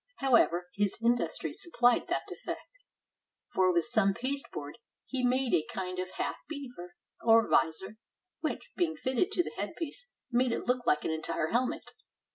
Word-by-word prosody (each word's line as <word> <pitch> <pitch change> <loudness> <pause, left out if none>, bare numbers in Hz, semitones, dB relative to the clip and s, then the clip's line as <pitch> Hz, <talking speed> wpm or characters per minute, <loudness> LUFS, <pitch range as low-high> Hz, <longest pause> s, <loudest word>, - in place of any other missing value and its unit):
However, 230 -10 +3
his 205 -1 +1
industry 235 +1 0
supplied 245 -8 +2
that - - 0
defect; - - -6 0.9
for 185 -1 +4
with 170 -1 +2
some 220 -5 +2
pasteboard 255 - -3 0.3
he 260 -1 -2
made 255 0 +2
a 155 - +4
kind 185 -1 -4
of 185 0 -3
half - - -1
beaver, 250 - -7 0.3
or 225 -1 +6
visor, 190 +6 +1 0.4
which, - - -3
being 335 -3 +1
fitted 260 +2 0
to 350 - +3
the - - -7
headpiece, 340 +9 -4 0.2
made 245 0 +3
it - - -3
look 250 0 0
like 150 - +3
an - - 0
entire 160 0 -1
helmet. 255 +5 -1
235 Hz, 155 wpm, -31 LUFS, 185-260 Hz, 0.9 s, or